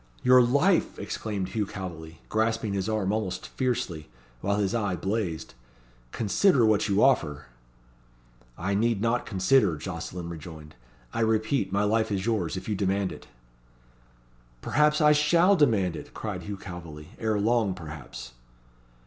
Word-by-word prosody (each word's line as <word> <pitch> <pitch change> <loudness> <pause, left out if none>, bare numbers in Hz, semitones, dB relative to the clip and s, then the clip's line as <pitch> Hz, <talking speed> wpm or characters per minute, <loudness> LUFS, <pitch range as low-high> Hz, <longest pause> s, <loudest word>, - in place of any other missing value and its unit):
"Your 125 0 +7
life!" 140 +10 +2
exclaimed 100 -4 -4
Hugh 105 -3 -2
Calveley, 85 -5 -8
grasping 110 -1 0
his 100 +1 -2
arm 105 -3 0
almost 105 -4 -3
fiercely, 90 - -2 0.3
while 100 +8 0
his 100 0 0
eye 105 -5 0
blazed. 95 -2 -3 0.6
"Consider 120 - +3
what 110 0 +2
you 100 +1 +3
offer." 75 - +2 1.1
"I 95 +3 -2
need 115 +1 +1
not 115 +3 0
consider," 95 - +3
Jocelyn 85 +4 -6
rejoined. 80 -2 -9 0.4
"I - - -2
repeat 110 -1 +1
my 100 +1 +1
life 110 +1 +1
is 95 -1 -1
yours, 100 -7 -1
if - - -7
you 110 - 0
demand 100 0 0
it." - - -11 1.4
"Perhaps 150 +2 +2
I 150 0 +6
shall 170 +6 +4
demand 105 - +2
it," - - -10
cried - - -4
Hugh 100 -1 -6
Calveley. 85 -4 -9
"Ere 110 -2 0
long, 110 -2 +1
perhaps." 75 -8 -9
100 Hz, 140 wpm, -27 LUFS, 90-115 Hz, 1.4 s, Your